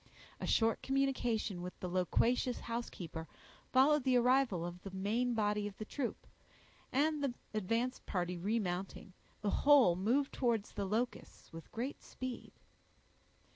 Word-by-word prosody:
A - - -3
short 225 0 +2
communication 245 -8 0
with 180 +1 -7
the 180 - -4
loquacious 230 +8 +1
housekeeper 180 -9 -5 0.4
followed 280 +2 +5
the 255 -1 +4
arrival 245 -8 +3
of 175 +1 -7
the 195 - -7
main 220 +6 0
body 210 -1 +1
of 200 - -9
the 215 - -5
troop, 250 +1 -4 0.7
and 300 +2 +2
the 260 -3 -1 0.2
advance 230 +5 0
party 180 -1 -2
remounting, 190 0 -2 0.3
the 205 -1 0
whole 275 -11 +7
moved 245 +10 +1
towards 235 -5 0
the 200 -2 -3
Locusts 225 0 -3
with 165 0 -10
great 250 +5 -4
speed. 255 -1 -6
225 Hz, 135 wpm, -35 LUFS, 190-255 Hz, 0.7 s, whole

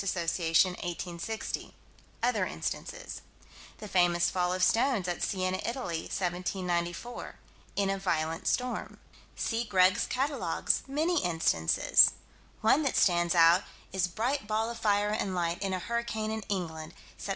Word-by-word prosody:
Assoc._, 170 -2 +2
1860 175 +3 -5 0.5
other - - +2
instances. - - -5 0.6
The 210 - -8
famous 175 -2 +3
fall 180 -1 0
of 185 0 0
stones 225 -1 +2
at 175 - -3
Siena, 185 -1 -1
Italy, 230 -10 -3
1794 180 +3 -3 0.4
"in 200 -1 +1
a 195 - -2
violent 165 -3 -1
storm." 250 0 -1 0.4
See 230 0 -1
Greg's 185 -4 +3
Catalogues 275 +3 0
many 315 +5 0
instances. 165 - +4 0.5
One 225 +7 +4
that 280 -4 0
stands 175 -1 +3
out 170 +2 +6 0.3
is 185 -2 +1
"bright 230 +7 -2
ball 220 +2 0
of 235 - -8
fire 205 -1 +2
and 200 -3 -1
light 170 0 -1
in 195 -1 -1
a 185 - 0
hurricane 220 +1 -2
in 220 0 -3
England, 165 -4 -4 0.2
Sept. - - -6
185 Hz, 135 wpm, -30 LUFS, 175-225 Hz, 0.6 s, out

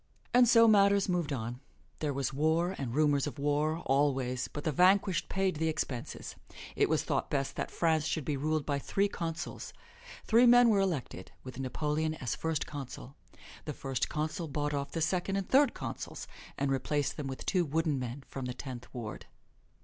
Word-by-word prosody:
And 245 0 +6
so 230 -1 +7
matters 200 -2 +5
moved 175 -5 0
on. 120 -2 -4 0.4
There 150 -2 -1
was 135 -1 -2
war, 160 +5 +1
and 125 -3 -3
rumors 145 -2 +3
of 145 - -6
war, 150 +3 0
alway; 135 -2 +1 0.2
but 145 - -6
the 155 - 0
vanquished 185 +3 +3
paid 190 -3 0
the 160 +1 0
expenses. 135 -6 -4 0.4
It - - +2
was - - +2
thought - - -1
best 140 -2 -1
that - - -3
France 160 -2 +1
should 160 -3 -2
be 145 - -1
ruled 155 +1 -1
by 140 -1 0
three 200 +8 +1
consuls. 165 -3 -5 0.5
Three 235 +2 +5
men 245 0 +7
were 205 -3 +4
elected, 160 - -2
with 130 0 -8
Napoleon 150 +4 -1
as 125 -6 -3
First 160 -2 -2
Consul. 135 -1 -8 0.5
The 150 - -3
First 135 -2 -2
Consul 155 +3 -2
bought 145 0 -2
off 140 -1 -2
the 165 - -3
Second 180 +4 0
and 195 -1 -2
Third 275 -1 +4
Consuls - - -6 0.3
and 140 0 0
replaced 135 +2 0
them 145 -3 -4
with 130 -1 -6
two 185 -3 +2
wooden 155 -2 0
men 125 +2 -5
from 135 -2 -6
the 125 0 -4
Tenth 125 -2 -8
Ward. 115 -3 -6
150 Hz, 185 wpm, -31 LUFS, 135-175 Hz, 0.5 s, so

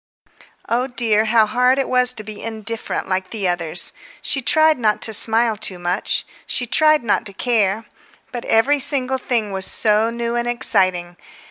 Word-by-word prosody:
Oh 245 +3 -1
dear, 225 -4 0
how 220 0 +3
hard 250 +4 +1
it 275 - -1
was 250 0 +4
to 215 - -6
be 215 0 -9
indifferent 225 0 -4
like 185 0 -2
the 205 -5 -3
others! 175 -3 -1 0.3
She 270 - +1
tried 310 +3 +2
not 215 -3 0
to 220 - +1
smile 225 +1 +4
too 190 -2 -2
much; 175 +2 -2 0.2
she 245 - -1
tried 305 +3 +2
not 220 - 0
to 200 - -10
care. 215 -1 -1 0.5
But 240 -1 -6
every 275 +6 +2
single 265 -2 +1
thing 230 -5 -2
was 190 -1 -3
so 215 +1 +1
new 235 0 -4
and 240 0 -2
exciting... 185 -7 0
225 Hz, 170 wpm, -19 LUFS, 205-250 Hz, 0.5 s, was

